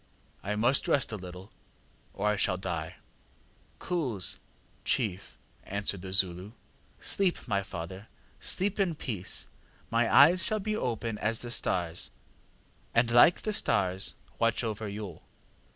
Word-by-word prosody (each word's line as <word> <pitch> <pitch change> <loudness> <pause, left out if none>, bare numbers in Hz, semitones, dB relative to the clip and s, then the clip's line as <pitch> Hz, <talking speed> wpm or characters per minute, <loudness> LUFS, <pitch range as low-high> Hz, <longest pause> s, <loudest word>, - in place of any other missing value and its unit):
I 105 +1 -2
must 120 +6 +2
rest 135 -5 +2
a - - -2
little, 90 0 -9 0.6
or 100 - -3
I 105 - +3
shall 90 -2 +1
die. 85 -4 -4 0.8
ŌĆÖ - - -14
ŌĆ£ŌĆśKoos! 135 - -1
ŌĆÖ - - -5 0.5
(chief), 100 -6 -1 0.2
answered 100 -1 -2
the 95 0 -7
Zulu. 95 +2 0 0.5
ŌĆśSleep, 190 -7 +1
my 100 -4 +1
father, 95 +2 -7 0.3
sleep 200 +2 +1
in 180 -5 +1
peace; 105 -10 -1 0.5
my 115 0 +2
eyes 170 +6 +7
shall 215 +3 0
be 215 +1 -2
open 115 - -2
as 110 +1 0
the 120 - -6
stars; 85 -6 0 0.9
and 115 0 +4
like 120 +9 +6
the 215 - -1
stars 95 - +2 0.2
watch 115 +1 +2
over 110 -1 -3
you. 100 -4 -6
105 Hz, 140 wpm, -29 LUFS, 95-125 Hz, 0.9 s, eyes